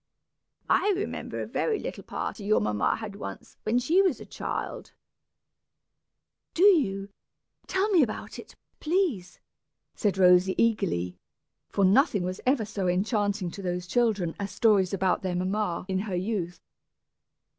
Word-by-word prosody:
I 415 - +3
remember 410 - -4
a - - -2
very 445 -2 -1
little - - -6
party 210 - -5
your 210 +2 +3
mamma 105 -1 +1
had 220 -3 -7
once, 100 - -8
when 220 +3 0
she 315 +10 +3
was 370 -8 +1
a - - -9
child - - -5 0.8
" - - -58
"Do 345 - +2
you? 205 - +4 0.6
Tell 380 +2 +1
me 370 -6 +5
about 225 -6 -3
it, - - -12 0.2
please," 305 - -1 0.5
said 205 -4 0
Rosy, 180 0 +5
eagerly, 170 - 0 0.5
for 200 - +2
nothing 205 - +3
was 185 +1 -4
ever 255 -4 +2
so 200 -3 -3
enchanting 200 0 0
to 200 - -8
those 180 -1 -3
children 205 -5 +1
as 200 0 -3
stories 200 -4 +3
about 190 -2 +1
their 185 -2 -2
mamma 185 0 -1
in 190 -1 -1
her 195 -2 -3
youth. 180 -3 -2
200 Hz, 145 wpm, -27 LUFS, 180-235 Hz, 0.8 s, me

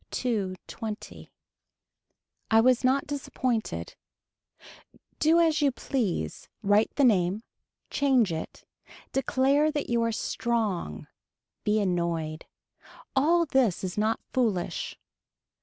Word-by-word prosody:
Two 210 -7 -1
twenty. 220 -2 -7 1.2
I 225 - +6
was 250 +2 +4
not 265 +2 +2
disappointed. 240 - -2 1.3
Do 320 +2 +4
as 320 -2 +3
you 285 -2 +4
please, 210 - -3
write 205 +2 +4
the 285 - +3
name, 200 -3 +3 0.5
change 255 -10 +3
it, 160 - -6 0.5
declare 270 +3 +2
that 295 -5 -3
you 235 0 +2
are 230 0 +1
strong, 215 - -2 0.6
be 210 +1 +2
annoyed. 170 -5 -1 0.7
All 335 +5 +4
this 260 - +1
is 185 -1 -3
not 215 +2 +1
foolish. 220 -9 -1
230 Hz, 105 wpm, -27 LUFS, 190-270 Hz, 1.3 s, I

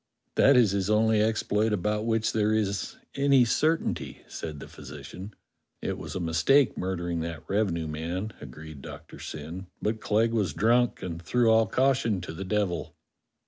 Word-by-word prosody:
"That 135 -1 +5
is 115 -6 +5
his 100 0 -1
only 110 0 +3
exploit 110 0 +1
about 105 +2 0
w^hich 115 -1 +1
there 110 0 +2
is 100 -2 -1 0.2
any 140 -2 +4
certainty," 160 +7 0
said 75 -3 -6
the - - -9
physician. 75 +8 -10 0.4
"It - - -2
was - - -7
a - - -1
mistake 85 - +3
murdering 85 -2 -2
that 80 -1 -5
revenue 95 -5 0
man," 85 +7 -4
agreed 75 +1 -10
Doctor 75 +1 -10
Syn, 80 +5 -7
"but 110 +1 -2
Clegg 115 +2 +2
was 100 -10 0
drunk, 120 +3 +2
and 85 -2 -5
threw 120 +5 +2
all 110 0 +4
caution 130 -5 +2
to 85 - -6
the 95 - -5
devil." 95 -3 -1
105 Hz, 160 wpm, -27 LUFS, 85-110 Hz, 0.4 s, That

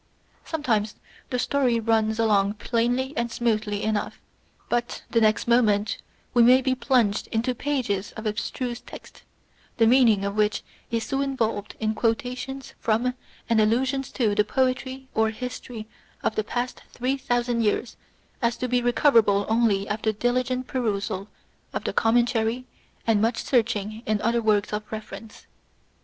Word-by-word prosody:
Sometimes 225 -9 -1 0.3
the 250 - -1
story 250 -2 +1
runs 220 -1 +1
along 205 -3 +2
plainly 245 +5 0
and 235 -2 -1
smoothly 215 -3 -1
enough; 215 -1 -2 0.5
but 240 0 -2
the 230 - +3
next 215 +1 +2
moment 215 -3 +3 0.3
we 240 - +5
may 250 +2 +7
be 260 0 +1
plunged 245 -6 +1
into 230 +3 0
pages 245 -8 -2
of 220 - -8
abstruse 235 +3 -3
text, - - -12 0.6
the 225 - +5
meaning 225 -5 +5
of 200 0 -2
which 210 -1 +1 0.3
is 230 -1 -1
so 270 +3 -1
involved 225 -7 -2
in 220 -1 0
quotations 250 +4 -2
from 235 +3 +1 0.3
and 230 -1 +3
allusions 260 +5 +1
to 220 -5 +1
the 210 0 +3
poetry 260 +3 -1
or 220 0 +2
history 230 -1 -6 0.4
of - - +1
the 215 - -1
past 245 +4 -3
three 255 +3 -1
thousand 245 -2 0
years 220 +2 0 0.5
as 235 -1 +1
to 255 - -2
be 250 0 +1
recoverable 230 -5 +4
only 220 -3 +2
after 220 +1 0
diligent 250 +3 0
perusal 210 -5 -2 0.5
of - - -3
the - - -2
commentary 235 +1 +2 0.4
and 220 -3 +3
much 225 +1 +1
searching 220 -3 0
in 215 -1 +1
other 235 +1 +2
works 210 -2 +1
of 210 0 -2
reference. 215 0 -8
230 Hz, 145 wpm, -25 LUFS, 215-250 Hz, 0.6 s, may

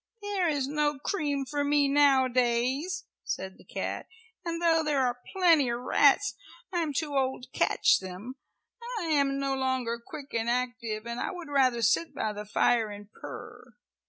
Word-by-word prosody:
"There 400 -3 0
is 285 -4 0
no 295 0 0
cream 290 -3 -1
for 290 +1 -1
me 285 0 +3
nowadays," 265 +3 +2 0.2
said 190 0 -5
the - - -15
cat, - - -4 0.4
"and 335 -1 -3
though 330 -1 +3
there 285 -4 +2
are 245 0 -2
plenty 335 -8 +4
of 235 0 -1
rats 285 +9 +4 0.4
I 350 - +1
am 315 -3 -1
too 290 0 -2
old 265 -2 0
to - - -11
catch - - +3
them. 190 +8 -8 0.6
I 340 -6 -2
am 280 -2 +2
no 275 0 -1
longer 260 -3 -1
quick 285 +2 -10
and 230 0 0
active, 240 -3 -2
and 235 0 -4
I - - -1
would 345 -4 -7
rather 255 -4 +2
sit 275 +10 +2
by 215 - -1
the 210 0 -6
fire 225 +1 +2
and 205 0 -10
purr. - - -10
270 Hz, 175 wpm, -28 LUFS, 240-300 Hz, 0.6 s, plenty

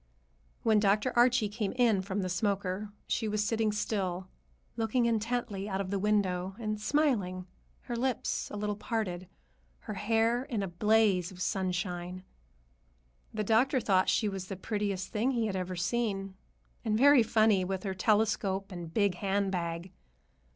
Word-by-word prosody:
When 220 -2 +4
Dr. 210 +4 +2
Archie 240 -2 +4
came 205 -1 -3
in 235 -6 +3
from 195 +1 -3
the - - -1
smoker, 200 +1 -1 0.2
she 225 - -1
was 210 0 0
sitting 220 0 +1
still, 190 -4 -2 0.5
looking 230 +2 +1
intently 225 -3 -1
out 190 -1 -2
of 195 -1 -3
the 200 - 0
window 190 -2 0
and 215 -2 -3
smiling, 210 -9 +1 0.4
her 240 - -5
lips 250 0 -1
a 210 - -6
little 210 0 -2
parted, 185 -5 -3 0.5
her 215 - -6
hair 225 +4 +1
in 230 -8 -2
a - - -2
blaze 195 0 +2
of 185 - -12
sunshine. 180 -1 -2 1.1
The 215 -1 -2
doctor 240 +6 +3
thought 190 -5 +2
she 215 - +2
was 195 -2 -4
the 195 - -5
prettiest 200 -1 -2
thing 235 +5 0
he 230 -2 +1
had 205 -3 -2
ever 185 0 -3
seen, 195 +1 -1 0.5
and 215 -2 +1
very 280 +1 +7
funny, 215 -3 +3
with 190 0 -3
her 195 -2 -2
telescope 200 -1 +1
and 175 -3 -7
big 200 0 +2
handbag. 185 -3 -1
205 Hz, 155 wpm, -30 LUFS, 185-225 Hz, 1.1 s, very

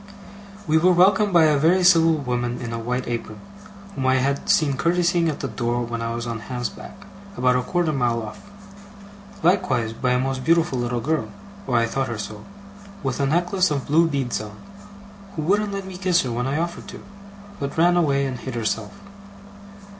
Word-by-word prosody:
We 160 0 +3
were 180 +2 +4
welcomed 195 +3 +4
by 170 -2 +5
a 150 -2 +4
very 175 +5 +3
civil 165 -2 +6
woman 125 -4 -2
in 115 -1 -5
a 115 - -3
white 125 +2 -3
apron, 115 -3 -5 0.5
whom 130 -8 -2
I 130 - +4
had 140 +2 -1
seen 140 -3 +3
curtseying 175 +2 +1
at 150 - -4
the 135 - -2
door 120 -1 -2
when 115 0 -4
I 115 0 -3
was 120 0 -4
on 115 -1 -4
Ham's 125 +1 -4
back, 200 0 -12 0.3
about 125 0 +3
a 125 - +2
quarter 175 +5 -1
of - - -3
a - - -1
mile 120 -2 +1
off. 105 - -9 1.0
Likewise 150 - +1
by 125 +2 0
a 125 - +2
most 130 0 -2
beautiful 165 -4 +2
little 120 0 -2
girl 145 -4 -1 0.4
(or 125 -3 +1
I 115 - +3
thought 135 +4 -2
her 115 - -4
so) 105 0 -7 0.6
with 135 -1 -2
a 140 - +1
necklace 180 +4 +1
of 140 -3 -2
blue 165 +3 +3
beads 130 -9 -2
on, 105 -1 -10 0.8
who 155 - -3
wouldn't 205 +5 +1
let 195 -1 -4
me 190 -1 -8
kiss 180 -2 +2
her 125 - -3
when 120 +2 -2
I 140 +2 -1
offered 170 +1 -4
to, - - -10 0.6
but 140 +1 -4
ran 175 +2 +4
away 140 -5 +2
and 130 -3 -4
hid 130 -2 -6
herself. 110 -2 -2
135 Hz, 205 wpm, -23 LUFS, 120-170 Hz, 1.0 s, civil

